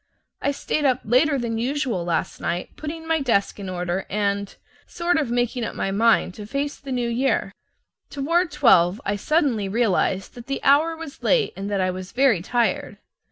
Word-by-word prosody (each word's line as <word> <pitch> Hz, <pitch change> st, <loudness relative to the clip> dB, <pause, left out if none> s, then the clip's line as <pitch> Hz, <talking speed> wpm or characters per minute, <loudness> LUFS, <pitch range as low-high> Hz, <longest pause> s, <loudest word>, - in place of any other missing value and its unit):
I -, -, +1 dB
stayed 285 Hz, +1 st, -2 dB
up 260 Hz, -3 st, +2 dB
later 265 Hz, +6 st, +3 dB
than 230 Hz, -3 st, -2 dB
usual 250 Hz, -, -1 dB
last 170 Hz, -2 st, -2 dB
night 175 Hz, +1 st, -3 dB
putting 320 Hz, +1 st, -6 dB
my 325 Hz, 0 st, +2 dB
desk 220 Hz, -6 st, +1 dB
in 195 Hz, -2 st, -5 dB
order 180 Hz, +1 st, -3 dB
and 200 Hz, 0 st, -1 dB, 0.3 s
sort 345 Hz, 0 st, 0 dB
of 285 Hz, -6 st, -1 dB
making 245 Hz, 0 st, 0 dB
up -, -, -4 dB
my 195 Hz, -, -1 dB
mind 220 Hz, -2 st, +3 dB
to 205 Hz, +1 st, -9 dB
face 280 Hz, +4 st, -2 dB
the 275 Hz, -1 st, -8 dB
New 245 Hz, -2 st, 0 dB
Year. 250 Hz, +3 st, 0 dB, 0.6 s
Toward 335 Hz, +5 st, +1 dB
twelve 215 Hz, -, +4 dB
I 200 Hz, -, 0 dB
suddenly 240 Hz, -, +1 dB
realized 195 Hz, -3 st, 0 dB
that 240 Hz, -1 st, -11 dB
the 275 Hz, -, -3 dB
hour 315 Hz, +4 st, +4 dB
was 320 Hz, -3 st, -9 dB
late 485 Hz, -3 st, +2 dB
and 195 Hz, +1 st, -5 dB
that 200 Hz, -2 st, 0 dB
I 185 Hz, 0 st, +1 dB
was 185 Hz, +1 st, -8 dB
very 250 Hz, -8 st, +3 dB
tired. 235 Hz, +5 st, -1 dB
240 Hz, 185 wpm, -23 LUFS, 200-285 Hz, 0.6 s, twelve